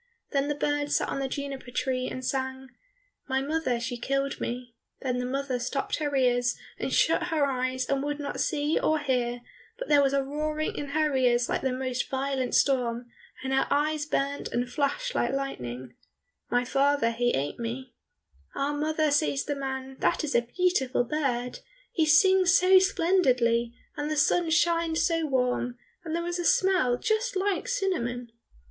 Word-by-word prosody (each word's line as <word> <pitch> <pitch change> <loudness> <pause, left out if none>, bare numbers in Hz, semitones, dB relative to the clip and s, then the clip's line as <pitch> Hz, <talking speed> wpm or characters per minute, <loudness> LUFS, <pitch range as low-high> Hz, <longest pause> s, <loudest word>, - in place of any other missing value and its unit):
Then 275 0 +1
the 295 - -1
bird 290 0 -1
sat - - +1
on - - -2
the 270 - -1
juniper 275 -1 -5
tree, 255 +1 -1
and 255 0 -6
sang, 265 0 -3 0.6
"My 265 0 +2
mother 275 -3 -1
she 245 +1 -4
killed 275 +2 -1
me," 245 0 -4 0.3
Then 250 -2 -1
the 250 - -2
mother 270 -1 -2
stopped 270 +3 -2
her 290 -2 -2
ears, 245 -2 +2 0.2
and - - -2
shut 330 +1 +3
her 315 -4 +2
eyes, 255 -1 -1
and 275 -1 0
would 290 +1 -3
not 285 -1 -4
see 300 +1 +1
or 315 - +2
hear, 250 -4 -1 0.4
but - - -6
there 290 -1 +6
was 275 -1 +2
a 275 -1 +2
roaring 305 +2 -2
in 290 - -4
her 300 0 +1
ears 245 -2 +2
like - - 0
the 265 - 0
most 255 -1 -2
violent 265 -1 -1
storm, 240 -3 +1 0.3
and 265 0 -2
her 270 - +2
eyes 295 +1 +1
burnt 280 -1 -1
and 245 +1 -2
flashed 300 - -1
like - - 0
lightning, 130 - -4 0.6
"My 245 +1 +1
father 275 -2 +2
he 240 +1 +1
ate 140 - -3
me," 240 +2 -5 0.6
"Ah, 280 +1 -1
mother," 310 +1 0
says 290 -1 +1
the 290 - -1
man, 265 -1 -5
"that - - +1
is 300 - -2
a 235 - +4
beautiful 265 -1 +1
bird! 250 -2 -2 0.3
He 320 -2 +1
sings 375 +3 +6
so 370 +1 +6
splendidly, 255 -12 +2 0.2
and 295 +1 -3
the 310 - -1
sun 330 +3 +3
shines 330 0 +2
so 330 -2 +1
warm, 250 -2 0 0.3
and 325 -1 -3
there 340 0 -2
is 350 0 -2
a - - -1
smell 355 -10 +3
just 440 - 0
like 390 +4 0
cinnamon." 250 - -2
275 Hz, 180 wpm, -27 LUFS, 250-310 Hz, 0.6 s, there